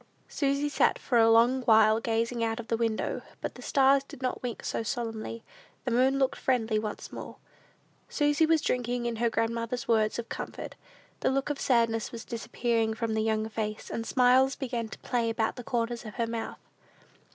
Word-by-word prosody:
Susy 280 0 0
sat 290 - +2
for 240 -3 +1
a 225 0 +6
long 235 +3 +5
while 220 -1 +6
gazing 230 +1 -1
out 225 +1 -1
of 235 - -8
the 230 - +2
window; 225 -1 -1 0.2
but - - -4
the - - -12
stars 275 -1 +4
did 275 - -12
not 255 -1 -2
wink 245 -2 -5
so - - -1
solemnly; 230 -1 -4 0.4
the 250 - -1
moon 260 +3 +3
looked 270 -1 +1
friendly 225 -4 +1
once 215 -1 -5
more. - - -7 0.7
Susy 295 +1 +2
was 320 -1 +3
drinking 245 0 -1
in 235 -1 -2
her 235 +1 +2
grandmother's 230 +2 -2
words 220 -2 +2
of 235 -1 -4
comfort. - - -6 0.5
The - - +1
look 275 +2 0
of 285 - -4
sadness 230 -3 +2
was 230 -1 -8
disappearing 230 -1 -1
from 225 0 -2
the 220 - +1
young 220 0 0
face, 215 -1 -4
and 230 - -2
smiles 255 +2 +4
began 240 -4 -3
to - - -9
play 235 -2 0
about 225 0 0
the 245 - -7
corners 235 0 -2
of 215 -3 -9
her 235 - 0
mouth. 230 0 -4
235 Hz, 190 wpm, -29 LUFS, 225-255 Hz, 0.7 s, a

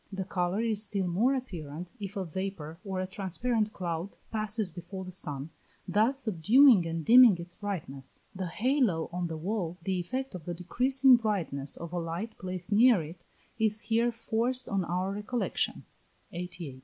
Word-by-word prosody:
The 195 -1 -3
colour 180 +2 -1
is 220 -3 +2
still 200 -3 -1
more 215 +10 +2
apparent 175 - -6
if 200 0 -5
a 190 - -2
vapour 170 -2 -5
or 190 -2 -3
a 185 - -1
transparent 210 +4 -1
cloud 175 -1 -3 0.2
passes 215 -2 -1
before 180 +3 -7
the 185 - -7
sun, 150 -5 -5 0.4
thus 225 +9 +2
subduing 220 - +5
and 165 -1 -3
dimming 240 -5 +8
its 170 0 -5
brightness. 160 -10 -5
The 185 -1 -4
halo 220 - +1
on 175 -1 -1
the 160 -1 -5
wall, 180 0 -2
the 185 0 0
effect 260 +9 -3
of 175 -4 -8
the 175 - -4
decreasing 255 +8 +4
brightness 175 -11 -2
of 170 0 -7
a 175 - -1
light 170 +7 -4
placed 185 +1 -5
near 220 -3 +6
it, 165 +3 -10 0.4
is 215 -1 +2
here 235 +1 +2
forced 235 +2 -1
on 195 -2 0
our 180 +3 -1
recollection. 210 0 -1 0.5
(88.) 180 +1 -5
406. 135 -5 -7
190 Hz, 170 wpm, -29 LUFS, 170-220 Hz, 0.5 s, dimming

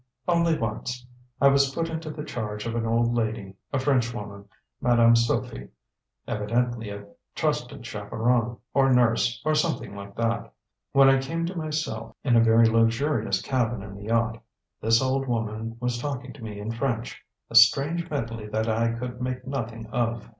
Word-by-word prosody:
"Only 170 -2 +3
once. 120 +2 -4 0.3
I 140 - +6
was 140 0 +3
put 165 0 0
into 160 -1 -5
the 150 0 -6
charge 105 -7 -5
of 115 - -2
an 115 -1 -1
old 115 +1 +2
lady, 110 -4 -2 0.2
a 135 - 0
Frenchwoman, 115 -7 -1 0.4
Madame 120 -1 +5
Sofie; 115 0 0 0.6
evidently 115 +1 -1
a 100 0 -7 0.3
trusted - - -2
chaperon, 120 0 -1 0.2
or 135 -1 +4
nurse, 120 -1 +3
or 155 - +3
something 155 - -1
like 100 0 -9
that. 115 -1 -1 0.4
When 135 0 +6
I 135 0 +5
came 165 +5 -2
to 180 +2 -4
myself 155 -9 -3
in 125 -4 +3
a 115 - +6
very 115 0 +6
luxurious 115 -2 +1
cabin 120 -5 -1
in 100 -1 -9
the 100 +1 -9
yacht, 115 0 0 0.4
this 115 +2 +3
old 135 +1 0
woman 115 -1 -3
was 125 0 -1
talking 135 -2 -4
to 130 - -12
me 105 -2 -6
in 105 +2 -4
French 115 -1 -3 0.3
a - - -6
strange 145 +9 +5
medley 115 -6 -4
that 110 +1 -1
I 115 +1 +1
could 120 +1 -6
make 125 0 -3
nothing 115 -4 -4
of. 120 -2 -1
115 Hz, 170 wpm, -26 LUFS, 115-135 Hz, 0.6 s, I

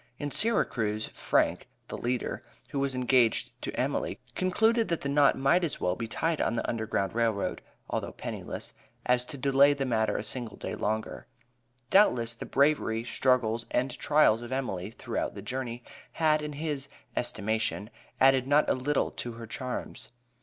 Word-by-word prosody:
In 145 0 -4
Syracuse, 110 - +1
Frank - - +1 0.2
(the - - -6
leader), 125 0 -2 0.3
who 140 - -1
was 135 -1 0
engaged 125 -2 +2
to - - -3
Emily, - - -1 0.2
concluded 220 +5 +2
that 170 - -1
the 140 - -2
knot 140 -1 +4
might 140 +7 +3
as 165 - -1
well 90 - 0
be 115 - -4
tied 160 +7 -1
on - - +1
the 115 - -1
U.G.R.R., 110 -1 0 0.3
although - - -3
penniless, - - -6 0.3
as 125 0 +3
to 140 - -8
delay 140 +2 +5
the 140 -1 -2
matter 110 -3 +1
a - - -3
single 115 0 -5
day - - -5
longer. 110 +1 -3 0.6
Doubtless, 125 - +4
the 115 - -8
bravery, 140 -5 +2
struggles, 115 -1 +1
and 130 +2 0
trials 145 -7 +3
of 120 +1 -8
Emily 105 -8 -2
throughout 115 - -4
the 100 - -6
journey, 125 0 -4 0.3
had, 155 -2 +2
in 150 0 -5
his 145 -2 -3 0.3
estimation, 110 -1 -1 0.3
added 135 -1 +5
not 145 +2 +4
a - - +3
little 135 +3 0
to 120 - -6
her 115 0 -8
charms. 125 +3 -5
125 Hz, 160 wpm, -29 LUFS, 115-145 Hz, 0.6 s, delay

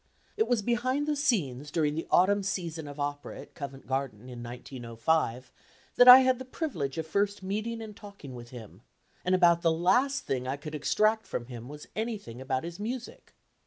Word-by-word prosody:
It 440 - +1
was 235 -4 +1
behind 255 +6 0
the 300 - +1
scenes 150 - 0
during 150 -1 +1
the 160 +2 -4
autumn 200 +3 +4
season 170 -5 -3
of 145 0 -9
opera 145 0 -4
at - - -15
Covent 140 -2 -8
Garden 130 -3 -3
in 120 -1 -8
1905 120 +2 -2 0.4
that 245 - +6
I 250 +1 +13
had 260 -1 +2
the - - -5
privilege 250 - -4
of 160 - -2
first 200 +4 -1
meeting 215 +4 -3
and 215 -2 -9
talking 200 - -11
with 120 -1 -9
him, 120 -4 -11 0.4
and 185 +1 +2
about 170 -2 +5
the 165 - +3
last 245 +12 +2
thing 130 -1 -2
I 135 +2 -2
could 150 +1 -8
extract 215 +8 +1
from 120 - -4
him 120 0 -9
was 150 0 -10
anything 215 - -4
about 130 0 -1
his 170 +2 -7
music. 240 +3 -6
165 Hz, 190 wpm, -29 LUFS, 135-220 Hz, 0.4 s, I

